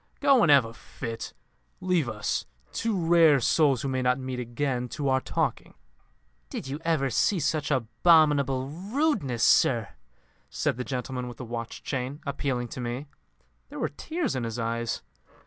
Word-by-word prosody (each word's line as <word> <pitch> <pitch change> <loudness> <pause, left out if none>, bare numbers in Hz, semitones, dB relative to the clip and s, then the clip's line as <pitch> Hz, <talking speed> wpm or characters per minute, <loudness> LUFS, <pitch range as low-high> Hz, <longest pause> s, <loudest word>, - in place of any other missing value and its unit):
Go 275 -4 +5
and 170 - +4
have 140 -4 +7
a 115 - -8
fit. 115 -1 -7 0.5
Leave 180 -8 +1
us 105 - -2 0.3
two 225 -3 -1
rare 165 -4 +6
souls 135 0 +3
who - - -1
may 130 -1 -1
not 125 0 +2
meet 130 -1 -4
again 125 +1 -2
to 145 0 -2
our 130 0 +2
talking." - - -2 0.7
"Did - - -6
you 140 +3 -4
ever 155 -5 +1
see 185 - +2
such 150 -2 0
abominable 140 0 +3
rudeness, 190 - -1
sir?" - - +4 0.6
said - - -1
the 125 - -2
gentleman 125 -1 -4
with 120 - -8
the 130 - -7
watch 115 0 -6
chain, 130 +1 -3
appealing 135 -4 -2
to 125 - -6
me. 120 +4 -4 0.6
There - - -9
were - - -1
tears 315 - -3
in 130 - -2
his 115 0 -4
eyes. 115 0 -2
135 Hz, 165 wpm, -27 LUFS, 120-155 Hz, 0.7 s, have